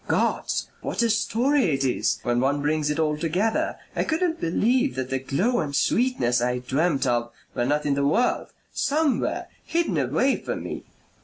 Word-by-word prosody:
Gods! -, -, 0 dB
What -, -, -1 dB
a 230 Hz, -, +3 dB
story 245 Hz, +6 st, +2 dB
it 140 Hz, -5 st, +1 dB
is 125 Hz, -, +1 dB
when 120 Hz, -1 st, +1 dB
one 140 Hz, +3 st, +1 dB
brings 150 Hz, 0 st, +1 dB
it 150 Hz, -, -1 dB
all 155 Hz, -2 st, +1 dB
together! 180 Hz, +8 st, 0 dB, 0.2 s
I -, -, +1 dB
couldn't 330 Hz, 0 st, -1 dB
believe 245 Hz, -, +1 dB
that 130 Hz, 0 st, -4 dB
the 135 Hz, -, 0 dB
glow 185 Hz, -, 0 dB
and 140 Hz, -2 st, -2 dB
sweetness 145 Hz, -, +2 dB
I 125 Hz, +1 st, 0 dB
dreamt 135 Hz, +3 st, 0 dB
of 120 Hz, -1 st, 0 dB, 0.2 s
were 120 Hz, -, 0 dB
not 150 Hz, +3 st, 0 dB
in 145 Hz, -, +2 dB
the 140 Hz, 0 st, +1 dB
world 235 Hz, +12 st, +1 dB, 0.3 s
somewhere. 300 Hz, -1 st, 0 dB, 0.2 s
Hidden 340 Hz, 0 st, 0 dB
away -, -, +1 dB
from -, -, -5 dB
me. -, -, -6 dB
155 Hz, 175 wpm, -25 LUFS, -, 0.3 s, a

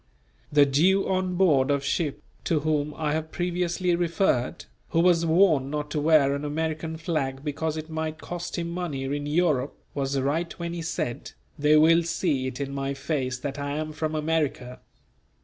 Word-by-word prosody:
The 145 Hz, -1 st, +6 dB
Jew 175 Hz, +8 st, +3 dB
on 185 Hz, -1 st, 0 dB
board 150 Hz, -8 st, +3 dB
of 140 Hz, -1 st, +1 dB
ship, 150 Hz, -1 st, -1 dB, 0.2 s
to 155 Hz, -3 st, +1 dB
whom 150 Hz, -1 st, 0 dB
I 150 Hz, -2 st, 0 dB
have 160 Hz, 0 st, -3 dB
previously 175 Hz, 0 st, 0 dB
referred, 170 Hz, -5 st, 0 dB, 0.2 s
who 165 Hz, -, +1 dB
was 170 Hz, -1 st, +4 dB
warned 160 Hz, -5 st, +4 dB
not 150 Hz, 0 st, -3 dB
to 155 Hz, -, 0 dB
wear 150 Hz, -3 st, +4 dB
an 140 Hz, +1 st, -3 dB
American 160 Hz, +2 st, -2 dB
flag 145 Hz, -5 st, -2 dB
because 155 Hz, +1 st, -2 dB
it 155 Hz, 0 st, -5 dB
might 160 Hz, -1 st, -3 dB
cost 175 Hz, +2 st, -6 dB
him 170 Hz, 0 st, -3 dB
money 170 Hz, -6 st, -3 dB
in 145 Hz, +2 st, -3 dB
Europe, 150 Hz, -4 st, +1 dB, 0.2 s
was 140 Hz, -1 st, -1 dB
right 155 Hz, +5 st, -1 dB
when 170 Hz, -1 st, -4 dB
he 170 Hz, -, -4 dB
said: 160 Hz, -7 st, -4 dB, 0.3 s
"They 150 Hz, +1 st, +5 dB
will 165 Hz, +2 st, +6 dB
see 165 Hz, -5 st, -1 dB
it 130 Hz, 0 st, -6 dB
in 140 Hz, -1 st, -3 dB
mine 140 Hz, 0 st, -2 dB
face 135 Hz, -2 st, -2 dB
that 140 Hz, +2 st, -5 dB
I 140 Hz, 0 st, -3 dB
am 155 Hz, 0 st, -3 dB
from 155 Hz, 0 st, -3 dB
America." 150 Hz, -5 st, -1 dB
155 Hz, 180 wpm, -26 LUFS, 140-170 Hz, 0.3 s, The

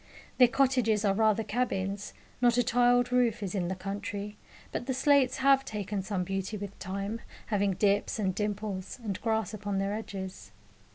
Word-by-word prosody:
Their 250 Hz, -, +9 dB
cottages 240 Hz, -4 st, +2 dB
are 195 Hz, -, +3 dB
rather 220 Hz, +1 st, +3 dB
cabins; 205 Hz, -3 st, -2 dB, 0.3 s
not 240 Hz, -1 st, +4 dB
a 245 Hz, -, +4 dB
tiled 245 Hz, +1 st, +3 dB
roof 240 Hz, -4 st, +2 dB
is 190 Hz, -, -3 dB
in 185 Hz, -4 st, -1 dB
the 190 Hz, -, -2 dB
country, 200 Hz, +2 st, -5 dB, 0.4 s
but 240 Hz, -, -4 dB
the 260 Hz, -, 0 dB
slates 270 Hz, -1 st, +4 dB
have 270 Hz, 0 st, +4 dB
taken 205 Hz, -4 st, -3 dB
some 190 Hz, -1 st, -2 dB
beauty 195 Hz, +3 st, -3 dB
with 200 Hz, 0 st, -7 dB
time, 200 Hz, +4 st, -4 dB, 0.3 s
having 200 Hz, -1 st, +2 dB
dips 205 Hz, +2 st, +1 dB
and 195 Hz, -4 st, 0 dB
dimples, 205 Hz, -1 st, -3 dB
and 200 Hz, -4 st, -3 dB
grass 220 Hz, -3 st, 0 dB
upon 205 Hz, -1 st, -3 dB
their 195 Hz, +1 st, 0 dB
edges. 190 Hz, -, -6 dB
210 Hz, 170 wpm, -29 LUFS, 195-235 Hz, 0.4 s, Their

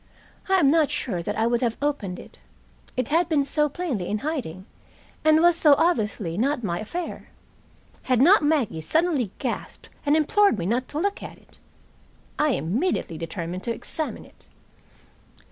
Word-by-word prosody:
I 385 Hz, -, +4 dB
am 295 Hz, -7 st, +4 dB
not 315 Hz, -2 st, +3 dB
sure 185 Hz, -8 st, -2 dB
that 205 Hz, +5 st, -4 dB
I 225 Hz, -, +2 dB
would 235 Hz, 0 st, +1 dB
have 235 Hz, -2 st, 0 dB
opened 275 Hz, -11 st, -2 dB
it -, -, -13 dB, 0.6 s
it 255 Hz, -2 st, -1 dB
had 330 Hz, +3 st, +2 dB
been 290 Hz, -4 st, +2 dB
so 300 Hz, +1 st, +1 dB
plainly 280 Hz, -, -3 dB
in 210 Hz, -, -1 dB
hiding, 205 Hz, -, -4 dB, 0.6 s
and 310 Hz, +1 st, +5 dB
was 345 Hz, -1 st, +5 dB
so 300 Hz, -4 st, +6 dB
obviously 210 Hz, -, 0 dB
not 265 Hz, +1 st, 0 dB
my 175 Hz, -4 st, -2 dB
affair 340 Hz, +11 st, -6 dB, 0.7 s
had 255 Hz, -2 st, +1 dB
not 345 Hz, +9 st, +6 dB
Maggie 290 Hz, -, 0 dB
suddenly 300 Hz, -, +1 dB
gasped -, -, -5 dB
and 290 Hz, +1 st, +3 dB
implored 400 Hz, -, +3 dB
me 170 Hz, -, -3 dB
not 240 Hz, +6 st, 0 dB
to 295 Hz, -, -4 dB
look 400 Hz, +3 st, -1 dB
at -, -, -9 dB
it. -, -, -15 dB, 0.8 s
I 300 Hz, -2 st, +3 dB
immediately 185 Hz, -, -1 dB
determined 170 Hz, +1 st, -5 dB
to 235 Hz, -, -1 dB
examine 310 Hz, +6 st, -5 dB
it. -, -, -19 dB
275 Hz, 165 wpm, -24 LUFS, 210-315 Hz, 0.8 s, so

